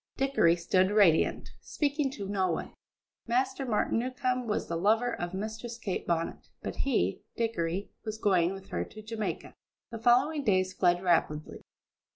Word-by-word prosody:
Dickory 270 Hz, -12 st, +3 dB
stood 185 Hz, +2 st, +2 dB
radiant, 200 Hz, -6 st, +3 dB
speaking 290 Hz, -1 st, -1 dB
to 200 Hz, -5 st, -5 dB
no 190 Hz, -2 st, 0 dB
one. 165 Hz, -, -3 dB, 0.5 s
Master 260 Hz, +3 st, 0 dB
Martin 220 Hz, 0 st, +1 dB
Newcombe 255 Hz, 0 st, -1 dB
was 210 Hz, -, -1 dB
the 170 Hz, -, -3 dB
lover 220 Hz, +7 st, +2 dB
of 175 Hz, +1 st, -4 dB
Mistress 220 Hz, +3 st, -5 dB
Kate 205 Hz, -5 st, -4 dB
Bonnet, 165 Hz, -1 st, -2 dB
but -, -, -5 dB
he, 90 Hz, +3 st, 0 dB
Dickory, 195 Hz, -5 st, -2 dB
was 215 Hz, -1 st, -4 dB
going 185 Hz, -5 st, +3 dB
with 195 Hz, 0 st, -9 dB
her -, -, -1 dB
to 215 Hz, -, -11 dB
Jamaica! 220 Hz, -1 st, -4 dB, 0.4 s
The 230 Hz, -, -5 dB
following 265 Hz, +6 st, +3 dB
days 185 Hz, -5 st, +2 dB
fled 175 Hz, -1 st, +2 dB
rapidly. 160 Hz, -4 st, 0 dB
210 Hz, 155 wpm, -29 LUFS, 180-240 Hz, 0.5 s, Dickory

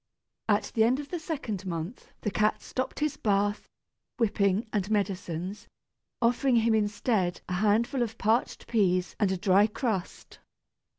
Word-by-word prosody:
At 205 Hz, 0 st, +2 dB
the 220 Hz, -, +4 dB
end 250 Hz, +4 st, +3 dB
of 290 Hz, -1 st, -7 dB
the 350 Hz, -, -3 dB
second 275 Hz, -, -4 dB
month 170 Hz, +6 st, -5 dB
the 210 Hz, -, -1 dB
cat 215 Hz, +1 st, +1 dB
stopped 260 Hz, +3 st, -4 dB
his 300 Hz, -1 st, 0 dB
bath, 205 Hz, -2 st, 0 dB, 0.5 s
whipping, 200 Hz, -2 st, +2 dB
and 200 Hz, -2 st, 0 dB
medicines, 190 Hz, -2 st, -2 dB, 0.5 s
offering 245 Hz, +2 st, +2 dB
him 230 Hz, 0 st, +3 dB
instead 210 Hz, -3 st, 0 dB
a 180 Hz, -, -3 dB
handful 215 Hz, +7 st, +2 dB
of 225 Hz, -1 st, -2 dB
parched 220 Hz, +3 st, 0 dB
peas 185 Hz, -5 st, +1 dB
and 205 Hz, -3 st, +2 dB
a 190 Hz, -, 0 dB
dry 195 Hz, +3 st, +4 dB
crust. 215 Hz, -4 st, -4 dB
210 Hz, 145 wpm, -28 LUFS, 195-235 Hz, 0.5 s, the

